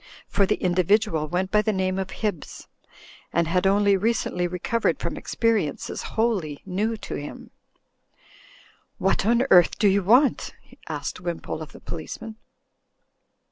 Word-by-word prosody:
For 200 - +2
the - - +2
individual 180 -3 +1
went 185 +4 -2
by 210 - +4
the 215 - 0
name 190 -1 -1
of 190 -1 -3
Hibbs, 205 -8 -5 0.6
and 170 -1 +1
had 180 +3 +2
only 200 0 +4
recently 195 -3 0
recovered 180 +6 -1
from - - -3
experiences 215 -11 -1 0.2
wholly 195 -11 0
new 210 +4 -1
to - - -7
him. 145 - -7 1.5
'What 195 +1 +1
on 235 +3 +3
earth 175 -2 +6
do 210 - +3
you 200 +1 +3
want?'* 245 +8 +3 0.3
asked - - -4
Wimpole 170 -3 -4
of 155 - -8
the - - -13
policeman. 215 +6 -7
190 Hz, 140 wpm, -24 LUFS, 175-215 Hz, 1.5 s, earth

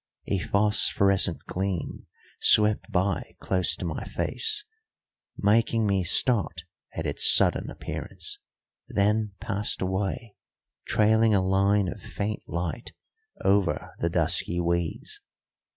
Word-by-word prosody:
A 100 - -1
phosphorescent 100 -3 +2
gleam 95 -2 -4 0.3
swept 105 0 +5
by 95 0 -1
close 90 -2 +1
to - - -6
my 80 -3 -4
face, 430 -2 -2 0.7
making 115 +2 +2
me 100 -2 +1
start 95 -2 +2 0.3
at 80 - -4
its 70 - +5
sudden - - +3
appearance, - - -7 0.5
then 105 +1 0
passed 105 +2 -1
away, 95 +4 -3 0.5
trailing 110 0 +3
a 95 -1 +1
line 100 +1 +2
of - - -6
faint 105 +1 -4
light 85 +6 -4 0.5
over 95 -2 +1
the - - 0
dusky 90 - -1
weeds. 85 -1 -2
100 Hz, 110 wpm, -26 LUFS, 90-105 Hz, 0.7 s, swept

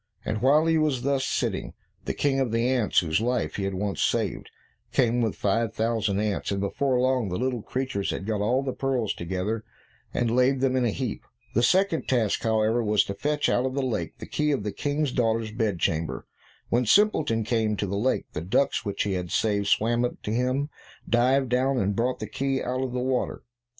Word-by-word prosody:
And 110 0 -2
while 145 +5 +4
he 165 -1 +3
was 145 -5 0
thus 140 -1 +1
sitting, - - -2 0.3
the - - -2
King 135 -2 +1
of 130 -4 0
the 115 +1 +1
ants 125 -5 +2
whose 80 +3 0
life 115 -10 -1
he 100 - -1
had 95 -1 -2
once 100 +1 -2
saved, - - 0 0.4
came 120 -2 +2
with 110 -3 0
five 110 +2 0
thousand 110 -3 0
ants, 105 -1 -1
and 100 - -1
before 125 +6 0
long 130 -4 +1
the 90 - -2
little 125 -1 -1
creatures 125 -5 -2
had 95 - -3
got 105 -1 -1
all 125 +6 +1
the 130 -2 -2
pearls 130 -5 -1
together, 95 +6 -3 0.5
and 120 -1 0
laid 130 +1 +3
them 130 0 +1
in 125 -1 +2
a - - +2
heap. 120 0 -3 0.3
The 120 - +3
second 185 +4 +2
task, 115 -5 +1
however, 110 +1 +2
was 105 -1 +3
to 100 - -5
fetch 150 +7 0
out 120 - +2
of 130 - -4
the 140 -1 0
lake 125 -4 -3
the - - -8
key 150 0 0
of 135 -7 0
the 105 - -2
King's 145 +4 -1
daughter's 115 -3 0
bed 110 -4 -1
chamber. 80 -1 -1 0.4
When 120 0 +1
Simpleton 155 - +3
came 110 -2 0
to 100 - -1
the 100 0 -3
lake, 120 +6 0
the - - -3
ducks 95 +11 +1
which 100 -1 -2
he 100 - -1
had 90 -2 -3
saved, 100 0 +1
swam 120 +4 +2
up 125 - -3
to 105 - -3
him, 130 +4 0 0.4
dived 130 +2 +3
down, 130 +2 +2
and 100 -3 0
brought 125 +3 0
the - - -4
key 135 -1 -2
out 130 +1 -2
of 130 -1 -2
the 125 - -2
water. 130 0 -1
120 Hz, 215 wpm, -26 LUFS, 105-130 Hz, 0.5 s, while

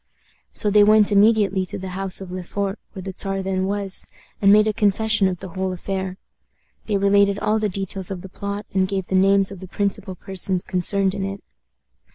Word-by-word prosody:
So 210 - -2
they 210 0 +6
went 215 0 +5
immediately 200 -2 +4
to - - -5
the 190 0 -6
house 190 0 -2
of 185 -2 -8
Le 185 0 -4
Fort, 200 +3 -3
where 190 -3 -8
the 190 0 -6
Czar 195 -1 -2
then 190 0 -1
was, 200 -1 +1 0.3
and 200 -1 +6
made 215 +1 +6
a 215 - +1
confession 210 0 +2
of 180 -2 -4
the 190 - -7
whole 190 +1 -3
affair. 190 0 -4 0.7
They 210 -2 +1
related 200 0 +3
all 215 +1 +1
the 215 -1 0
details 195 0 -4
of 185 -3 -6
the - - -7
plot, 200 +2 -5
and 190 -1 +2
gave 190 -1 -2
the - - -6
names 195 +1 +4
of 195 - -9
the 185 - -9
principal 200 0 -3
persons 185 0 -2
concerned 190 +1 0
in 195 -1 -3
it. 195 +1 -5
195 Hz, 210 wpm, -22 LUFS, 190-205 Hz, 0.7 s, they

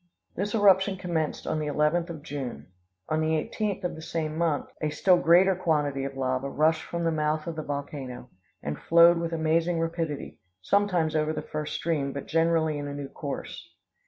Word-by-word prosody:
"This 205 +4 -2
eruption 195 -2 +4
commenced 170 -4 -2
on 155 - -1
the 150 - -2
11th 150 +4 +1
of 160 -4 -7
June. 130 - -5 0.4
On 155 0 0
the 155 0 +1
18th 205 +3 -3
of 180 - -1
the 160 - -9
same 160 -1 -3
month, 160 -3 0 0.2
a 155 - 0
still 180 +4 +4
greater 180 +3 +5
quantity 150 -6 0
of 135 0 -6
lava 130 +1 -1
rushed 160 +3 +2
from 170 0 -4
the 165 - +2
mouth 155 0 0
of 170 - -4
the 155 - -3
volcano, 140 -4 -6 0.3
and 75 - -4
flowed 170 +1 +6
with 170 0 -2
amazing 165 +1 +1
rapidity, 165 -5 -3 0.2
sometimes 175 - +1
over 155 0 +1
the 150 -1 -4
first 150 0 -4
stream, 145 -5 -1
but 140 - -5
generally 165 -2 +1
in 145 - -4
a 140 - -5
new 140 -1 -6
course. - - -6
160 Hz, 190 wpm, -27 LUFS, 145-170 Hz, 0.4 s, flowed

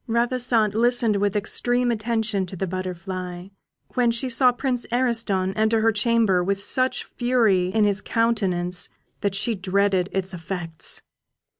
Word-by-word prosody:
Ravissante 235 -2 +2
listened 235 -1 +2
with 205 +1 0
extreme 245 +4 +1
attention 220 -3 -1
to 190 - -8
the 190 - -2
Butterfly, 185 0 -6 0.4
when 245 -2 +2
she 235 +3 -2
saw 250 +2 +5
Prince 245 0 -3
Ariston 225 -6 +1
enter 220 +1 +1
her 225 +1 +3
chamber 215 -4 +2
with 200 +2 +1
such 255 +6 +2
fury 230 -7 +1
in 215 +3 +1
his 205 -1 +1
countenance, 190 -6 0 0.3
that 200 -1 -1
she 225 +4 0
dreaded 195 -1 0
its 190 0 -3
effects. 170 -1 -5
210 Hz, 140 wpm, -23 LUFS, 185-235 Hz, 0.4 s, saw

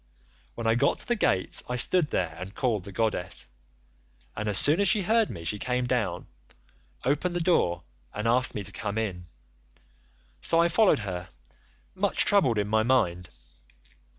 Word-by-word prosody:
When 115 - -6
I 115 - +3
got 120 - +1
to - - -10
the 240 - +1
gates 95 - +1
I 125 - -2
stood 160 +6 +4
there 85 - -2
and 95 +3 -8
called 110 -8 -1
the 100 - -8
goddess, 95 -3 -2 0.9
and 110 0 -3
as 100 - 0
soon 150 - +3
as 200 - +3
she 210 0 +3
heard 225 +3 +2
me 85 - -8
she 105 +5 -3
came 125 +2 -1
down, 110 -9 -2 0.8
opened 155 +7 0
the - - 0
door, 90 - +1 0.3
and 105 +2 -4
asked 125 +2 +2
me 105 - -4
to - - -5
come 100 +2 -5
in; 90 -6 -4 1.1
so 165 - +3
I 170 0 +3
followed 210 - +3
her—much 100 - -3
troubled 180 - +4
in 105 -1 0
my 110 +1 +2
mind. 90 -8 0
115 Hz, 170 wpm, -26 LUFS, -, 1.1 s, stood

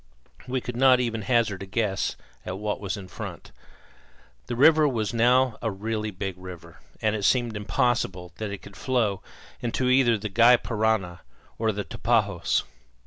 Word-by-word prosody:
We 130 0 -1
could 125 0 -6
not 130 0 +5
even 115 -3 -1
hazard 110 -4 +1
a 100 - -6
guess 100 -1 -1 0.3
at 90 +1 -5
what 105 +1 -3
was 100 -1 -3
in 95 -2 -9
front. - - -8 1.0
The 120 - -3
river 155 +4 +6
was 115 -5 -1
now 125 +1 +3
a 115 - 0
really 110 +2 -3
big 95 -2 -5
river, 85 -3 -11 0.2
and 110 0 +2
it 105 - -3
seemed 120 0 +2
impossible 105 -4 -1
that 110 -1 -4
it 100 -1 -7
could 100 - -12
flow 110 -4 0 0.4
either 120 - -2 0.5
into - - -2
the 105 +1 -4
Gy 120 +4 +6
Parana 105 -5 -1 0.4
or 110 -1 +2
the 105 0 -4
Tapajos. - - 0
110 Hz, 165 wpm, -26 LUFS, 100-120 Hz, 1.0 s, river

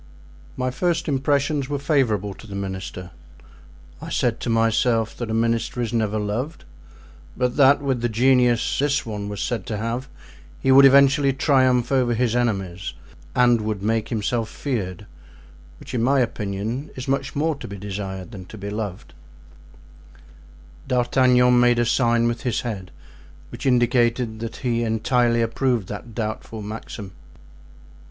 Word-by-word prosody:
"My 130 0 -1
first 170 +5 -1
impressions 140 0 0
were 145 - -1
favorable 125 - 0
to 110 - -14
the 100 - -8
minister; 95 -2 -5 0.9
I 165 - -7
said 120 -7 0
to - - -4
myself 115 0 +2
that 120 -2 -4
a - - -2
minister 115 +2 0
is 120 -2 -2
never 110 -2 0
loved, 110 +10 -3 0.7
but 125 -1 0
that 140 0 +5
with 130 -4 0
the 120 - 0
genius 125 0 +2
this 145 0 +1
one 105 -2 -5
was 105 -1 -5
said 115 -6 -3
to 105 - -3
have 115 +5 -3 0.5
he 135 - +2
would 135 +1 +8
eventually 140 0 +5
triumph 130 -3 +2
over 125 -3 +2
his 120 0 +1
enemies 95 -7 -2 0.4
and 120 -2 +4
would 105 -2 -3
make 110 0 0
himself 115 0 -1
feared, 100 - -4 0.7
which - - -11
in 120 - 0
my 135 +3 +3
opinion 115 +3 -2
is 130 0 -6
much 135 0 -1
more 160 +3 +1
to 140 - -9
be 100 - -7
desired 95 0 -6
than 95 -5 -9
to 110 - -11
be 100 0 -6
loved——" 105 -5 -5 1.7
D'Artagnan 125 -1 +4
made 120 -1 +4
a 120 - +2
sign 120 -1 +2
with 120 0 -2
his 125 -5 -1
head 100 -6 -5 0.6
which 120 +3 -5
indicated 120 -2 +2
that 115 0 -5
he 120 -1 +1
entirely 115 +1 +2
approved 115 -3 0
that 115 -3 -8
doubtful 110 0 -4
maxim. 105 -1 -7
120 Hz, 150 wpm, -23 LUFS, 110-130 Hz, 1.7 s, would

